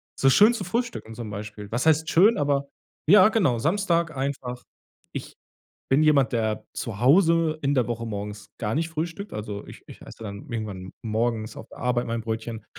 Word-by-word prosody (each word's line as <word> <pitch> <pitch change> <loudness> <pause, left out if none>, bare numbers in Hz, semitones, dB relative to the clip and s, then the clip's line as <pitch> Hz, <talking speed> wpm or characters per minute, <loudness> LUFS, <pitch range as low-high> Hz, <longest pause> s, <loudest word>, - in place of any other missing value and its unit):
so 135 - +4
schön 215 - +7
zu 210 - -3
frühstücken 230 - -3
zum 115 -2 -6
Beispiel. 105 0 -7
Was 120 +6 -1
heißt 160 0 +3
schön, 205 +7 +5
aber 140 -1 0 0.4
ja, 200 +3 +8
genau, 170 - +2
Samstag 170 - +1
einfach. 130 -2 -3 0.5
Ich - - -7 0.6
bin 140 +3 +4
jemand, 140 -4 +4
der 110 -2 -1
zu 110 -4 -5
Hause 165 +2 +4
in 140 +1 +1
der 125 -3 +2
Woche 115 -1 -3
morgens 105 0 -6
gar 110 +1 -2
nicht 165 +2 -1
frühstückt. 165 +5 -4
Also, 105 -1 -5
ich - - -12
ich - - -13
esse - - -12
dann 100 +2 -8
irgendwann 100 -5 -5
morgens 110 0 -1
auf 110 - -9
der - - -14
Arbeit 125 -1 0
mein 115 0 -2
Brötchen. 110 0 -5
125 Hz, 185 wpm, -25 LUFS, 110-160 Hz, 0.6 s, ja